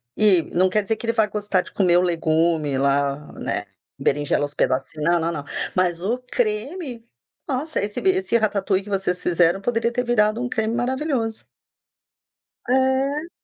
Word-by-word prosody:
E 200 -6 +5
não 185 +2 +3
quer 210 +3 +1
dizer 225 +3 -1
que 220 - -8
ele 230 - +1
vai 220 -2 +3
gostar 205 -3 0
de - - -11
comer 180 -3 +3
o - - +4
legume 160 -4 +1
lá, 140 +1 0
né? - - -3 0.3
Berinjela 145 0 +1
aos 145 0 -3
pedacinhos. 135 +4 -1
Não, 175 0 +3
não, 165 +1 -1
não. 145 -4 -5 0.3
Mas 175 -2 +1
o 220 +7 0
creme, 245 - -2 0.4
nossa, 295 +3 -1
esse 205 0 -3
b 380 - +3
esse 375 -10 +1
ratatouille 200 -3 0
que 205 - -11
vocês 190 -2 -1
fizeram 175 +1 +2
poderia 235 +1 0
ter 245 +1 -1
virado 220 -1 +2
um 245 - -1
creme 220 -1 -1
maravilhoso. 245 -2 -2 1.2
É. 265 +5 +1
210 Hz, 170 wpm, -22 LUFS, 170-240 Hz, 1.2 s, E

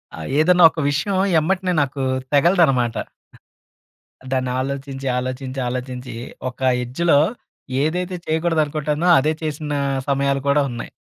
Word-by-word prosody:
ఆహ్, 80 -1 -7
ఏదన్నా 175 +3 +5
ఒక - - -7
విషయం 155 +7 -1 0.2
ఎమ్మటనే 185 +3 0
నాకు 140 0 -2 0.3
తెగలదనమాట. 140 -7 +3 1.4
దాన్ని 130 -1 0
ఆలోచించి, 135 0 -5
ఆలోచించి, 130 +1 -4
ఆలోచించి 125 0 -5 0.4
ఒక 125 - -22 0.2
ఎడ్జ్‌లో 140 +5 +2 0.6
ఏదైతే 180 +4 -1
చేయకూడదనుకుంటానో 155 -1 0
అదే 150 +4 +1
చేసినా 150 -1 -3 0.3
సమయాలు 140 0 +1
కూడా 145 +1 +4
ఉన్నాయి. 120 -1 -6
145 Hz, 110 wpm, -21 LUFS, 130-160 Hz, 1.4 s, ఏదన్నా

